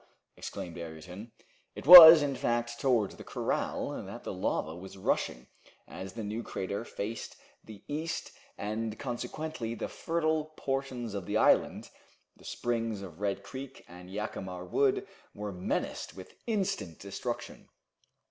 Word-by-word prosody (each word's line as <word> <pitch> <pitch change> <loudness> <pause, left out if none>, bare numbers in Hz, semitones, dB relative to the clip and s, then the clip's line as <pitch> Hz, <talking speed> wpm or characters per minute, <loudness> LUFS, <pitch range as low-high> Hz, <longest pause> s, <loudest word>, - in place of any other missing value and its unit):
exclaimed 85 -1 -7
Ayrton. 90 +7 -9 0.4
It - - -8
was, 165 -2 +13
in 140 -2 -1
fact, 120 -2 -1
towards 120 -7 +1
the - - -10
corral - - -2
that - - -9
the - - -5
lava 80 +1 -2
was 95 +2 -10
rushing 65 -8 -1 0.4
as 95 0 -8
the 115 - -6
new 105 +3 -3
crater 100 -1 -4
faced 110 0 -6 0.3
the 110 -3 -13
east, 155 +3 -4 0.3
and 110 +1 -3
consequently 125 -1 -4
the - - -4
fertile 160 -2 -1
portions 135 -4 -3
of 100 -3 -5
the - - 0
island, - - +2 0.4
the - - -19
springs 115 -4 -2
of 90 -3 -10
Red 100 -1 -2
Creek 135 +5 -9
and 90 +1 -12
Jacamar 95 -3 -5
Wood, 135 +8 +1 0.3
were 105 0 -5
menaced 90 -1 -3
with 95 - -11
instant 190 - -2
destruction. 100 -1 -6
110 Hz, 140 wpm, -30 LUFS, 95-135 Hz, 0.4 s, was